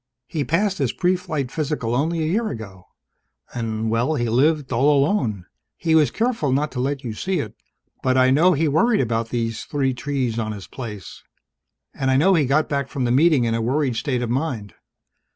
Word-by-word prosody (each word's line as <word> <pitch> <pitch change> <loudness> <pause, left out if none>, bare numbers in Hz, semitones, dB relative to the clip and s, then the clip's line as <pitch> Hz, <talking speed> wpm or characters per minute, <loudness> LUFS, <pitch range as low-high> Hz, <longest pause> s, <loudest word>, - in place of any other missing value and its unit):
"He 150 +2 -3
passed 195 +6 0
his - - 0
pre 180 0 +2
flight 155 -8 -4
physical 145 -7 -2
only 160 +5 0
a - - 0
year 220 +7 0
ago. 95 -6 -9 0.7
And 110 -2 -2
well, 120 +7 +1
he 120 -4 -1
lived 145 +4 +2
all 140 +5 +3
alone. 110 - -1 0.3
He 160 - 0
was 155 -5 +5
careful 225 - -1
not 145 +3 0
to 125 - -5
let 135 +2 -2
you 115 -3 -4
see 185 - -2
it, 110 -6 -4 0.5
but 130 0 +1
I 130 0 +5
know 170 +7 +5
he 160 +1 +1
worried 215 +10 +3
about 115 -2 -1
these 115 -2 -2
three 135 -3 -1
trees 125 -3 -2
on 110 -1 -2
his 100 -3 -8
place. 105 -8 -8 0.7
And 135 - -1
I 130 - +3
know 185 +7 +4
he 155 -5 +3
got 150 +4 +2
back 140 -2 -1
from 135 -1 -3
the 120 - +1
Meeting 145 0 +4
in 115 -1 0
a 115 - 0
worried 130 +2 0
state 125 0 -1
of 120 - -2
mind. 125 -7 -2
135 Hz, 205 wpm, -22 LUFS, 115-155 Hz, 0.7 s, was